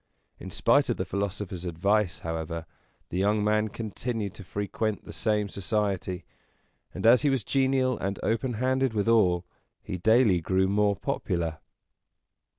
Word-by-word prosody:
In - - -7
spite - - +3
of - - 0
the - - -2
philosopher's 100 -2 -3
advice, 90 +3 +1
however, 80 0 -3 0.4
the 90 - -2
young 105 +2 +2
man 105 +1 +2
continued 110 -1 -4
to 100 - -10
frequent 105 +3 -3
the - - -9
same 105 -2 0
society; 95 -3 -2 0.7
and, 95 - -5
as 120 +2 +7
he 145 - +3
was 135 -5 0
genial 130 0 +1
and 95 +1 -2
open 120 +3 0
handed 130 +1 0
with 105 +1 0
all, 90 -6 +3 0.4
he 90 - -5
daily 110 -2 +4
grew 95 +3 +2
more 100 +1 +2
popular. 85 -4 -2
105 Hz, 150 wpm, -27 LUFS, 95-110 Hz, 0.7 s, as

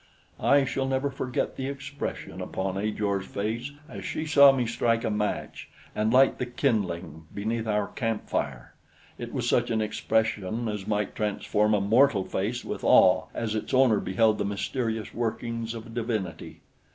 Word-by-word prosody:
I 140 -1 +4
shall 135 +1 -1
never 135 +1 0
forget 130 -2 -3
the 130 - -3
expression 140 +1 -5
upon 95 0 -3
Ajor's 100 -1 -1
face 110 +6 -3 0.2
as - - -8
she 155 - -3
saw 140 -3 +8
me 130 -2 0
strike 115 0 +1
a 110 - 0
match 105 0 -3 0.2
and 110 +1 0
light 130 +2 +5
the 125 - -2
kindling 90 - -2
beneath 110 +2 -3
our 105 -1 +1
camp 115 -4 -3
fire. - - -3 0.5
It - - -6
was - - -2
such - - +2
an 115 -1 +1
expression 110 0 -1
as 105 -2 -4
might 105 -1 -1
transform 105 0 +1
a 100 - +1
mortal 110 0 +4
face 115 +6 -2
with - - -5
awe 90 0 +5
as 110 -2 -2
its 110 +4 -2
owner 125 -5 +5
beheld 110 +3 +2
the - - +1
mysterious 110 +2 -2
workings 115 0 -3
of 115 0 -9
divinity. 110 -6 -4
110 Hz, 165 wpm, -27 LUFS, 105-125 Hz, 0.5 s, saw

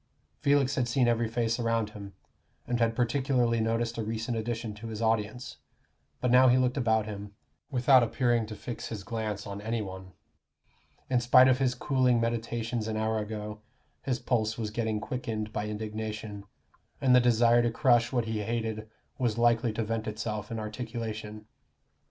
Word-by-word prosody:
Felix 140 -1 +3
had 130 -4 0
seen 120 +1 +2
every 115 -1 +2
face 115 0 -1
around 115 -2 0
him, 100 -2 -9 0.5
and 120 -1 -1
had 115 -1 +2
particularly 125 -1 +1
noticed 115 +1 -1
a - - -1
recent 115 +2 -3
addition 115 -1 -3
to 105 +2 -9
his 110 -1 -5
audience; 115 +2 -1 0.6
but 125 - +1
now 130 +1 +7
he 125 0 +5
looked 125 0 +2
about 110 -5 +2
him, 100 -1 -7 0.3
without 130 -1 +5
appearing 120 -1 +1
to 110 - -7
fix 120 +2 -6
his 105 -3 -6
glance 105 -1 -4
on 100 0 -6
any 115 +2 -2
one. 95 -2 -7 0.9
In 125 -1 +2
spite 125 +2 +7
of 130 0 +3
his 130 -2 +1
cooling 125 -2 +2
meditations 115 0 -2
an 110 -1 -2
hour 110 0 0
ago, 105 0 -5 0.4
his 130 -2 -1
pulse 110 -4 0
was 110 -3 -3
getting 110 -1 -1
quickened 110 -2 -4
by 105 - -2
indignation, 105 -1 -5 0.5
and 130 -2 +4
the - - +8
desire 120 0 +4
to 120 - +2
crush 120 -1 +3
what 120 -3 0
he 110 -1 -2
hated 110 0 -3 0.3
was 120 -4 0
likely 120 0 +3
to 115 - -1
vent 110 0 -3
itself 105 -1 -4
in 115 - -4
articulation. 110 -1 -5
115 Hz, 170 wpm, -29 LUFS, 110-120 Hz, 0.9 s, the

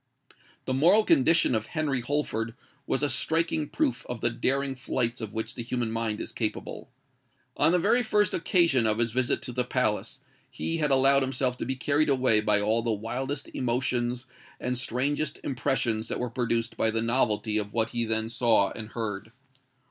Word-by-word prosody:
The 130 - -1
moral 175 +11 +5
condition 160 -4 +4
of 110 -1 -1
Henry 150 -6 -1
Holford 120 -4 -2 0.3
was 135 - 0
a - - +3
striking 160 +1 0
proof 300 -5 -1
of 125 -2 -4
the 120 - +1
daring 135 +3 0
flights 120 -1 -2
of 110 0 -6
which 110 - -2
the 120 - -5
human 120 -1 -2
mind 115 -2 -2
is - - -6
capable. 110 -3 -4 0.7
On - - +3
the 180 - +3
very 235 +8 +3
first 210 -4 +1
occasion 165 - +3
of 110 0 +1
his 115 -1 +1
visit 125 +1 0
to - - -4
the 125 +1 0
palace, 125 -4 -1 0.3
he 165 - -3
had 150 -2 0
allowed 135 +1 +4
himself 130 -1 -1
to - - -4
be 130 - -1
carried 145 +3 +1
away 130 -5 +4
by 105 -1 +3
all 110 +3 +1
the 115 0 0
wildest 130 +7 -4
emotions 125 0 -1 0.3
and 125 0 -2
the - - -3
strangest 140 +4 -1
impressions 120 -4 -1
that - - -3
were 125 -2 -3
produced 115 -1 -1
by 110 - +2
the 115 0 0
novelty 110 -3 +1
of 105 0 -5
what 110 -1 +1
he 120 -1 -1
then 110 -1 0
saw 115 -4 +2
and 110 -1 -8
heard. 110 -2 -4
125 Hz, 185 wpm, -27 LUFS, 115-140 Hz, 0.7 s, moral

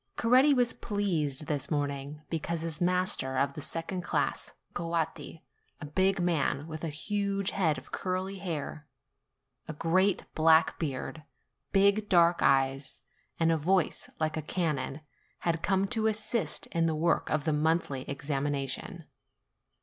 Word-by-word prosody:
Coretti 255 +5 +5
was 250 -3 +3
pleased 165 - -1
this 145 -3 -2
morning, 145 0 -3
because 165 0 -2
his 165 -1 -4
master 180 -7 +2
of 140 +1 +1
the 150 - -7
second 165 +5 -3
class, - - -2 0.2
Coatti, 165 -1 -3 0.4
a - - -6
big 190 +6 +1
man, 160 -4 0
with 160 0 -7
a 165 - -1
huge 200 +5 -1
head 160 -7 +1
of 130 - -11
curly 190 +1 -3
hair, 155 -4 -5 0.8
a 155 - -4
great 185 +5 +2
black 160 0 +4
beard, 155 0 -4 0.5
big 200 +2 +3
dark 170 -2 +5
eyes, 135 -1 +1 0.4
and 165 0 +3
a 165 - +2
voice 180 +2 +1
like 155 -1 0
a 160 - -2
cannon, 150 -3 -2 0.4
had 165 -1 0
come 195 +1 +2
to 220 -1 +1
assist 215 -5 -1
in 165 -1 +2
the 160 - 0
work 165 +2 +1
of 155 -1 0
the 155 - +2
monthly 150 -3 +1
examination. 140 +4 -3
165 Hz, 140 wpm, -30 LUFS, 150-185 Hz, 0.8 s, Coretti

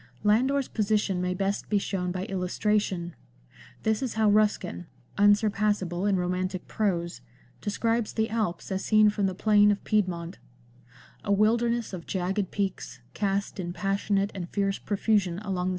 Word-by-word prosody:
Landor's 260 +6 +2
position 210 -4 0
may 180 0 -1
best 195 +1 -2
be 210 - +3
shown 185 -2 -2
by 185 +1 -3
illustration. 185 -1 -1 0.7
This 220 +1 +1
is 255 -5 -3
how 220 -1 +3
Ruskin 205 -4 +1
— - - -31
unsurpassable 205 -3 +2
in 200 - +3
romantic 180 0 -2
prose 170 - -1 0.2
— 125 - -31
describes 225 +2 -1
the 220 0 0
Alps 215 -7 -2
as 190 0 -2
seen 215 -1 +5
from 205 -2 0
the 190 - -3
plain 210 +1 +4
of 205 -1 0
Piedmont 185 -4 -1 0.4
— 120 +1 -25
"A 200 - -2
wilderness 230 +2 +2
of 175 -3 -7
jagged 190 +1 -1
peaks, 195 -10 -3
cast 200 0 -1
in 175 -1 -4
passionate 195 +2 0
and 175 -3 -6
fierce 195 -1 -1
profusion 205 -3 +1
along 210 - -8
the - - -6
XX 190 - 0
LANDOR. 180 +1 0
200 Hz, 165 wpm, -27 LUFS, 180-215 Hz, 0.7 s, seen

